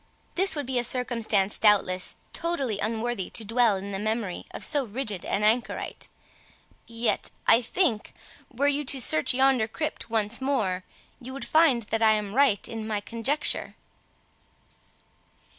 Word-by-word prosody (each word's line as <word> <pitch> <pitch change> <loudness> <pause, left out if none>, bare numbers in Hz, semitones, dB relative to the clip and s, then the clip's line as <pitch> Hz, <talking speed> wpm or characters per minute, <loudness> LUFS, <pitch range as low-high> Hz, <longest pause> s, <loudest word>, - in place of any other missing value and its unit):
This 375 -2 +3
would 290 -2 -3
be 255 -1 0
a - - -1
circumstance, 230 -5 0
doubtless, 190 -4 +2 0.2
totally 275 -11 -2
unworthy 225 -2 -2
to 225 - -4
dwell 230 -1 +3
in 195 +1 -6
the 195 - -3
memory 215 -3 -3
of - - -5
so 290 -3 +3
rigid 220 -4 -4
an 210 - -1
anchorite; 225 +3 -1 0.8
yet, 230 0 -2 0.2
I 230 - +6
think, 240 - 0 0.4
were 275 +3 0
you 285 +1 +1
to 270 0 0
search 155 -2 +3
yonder 265 -4 +3
crypt 300 0 -5
once 225 +2 0
more, 210 -10 -1 0.4
you 255 +2 -8
would 275 - -4
find 310 -7 +3
that 225 +2 -2
I 220 -1 +5
am 210 -2 -2
right 265 -6 +3
in 225 -1 -6
my 215 -2 -1
conjecture." 230 +8 -1
230 Hz, 150 wpm, -26 LUFS, 210-265 Hz, 0.8 s, I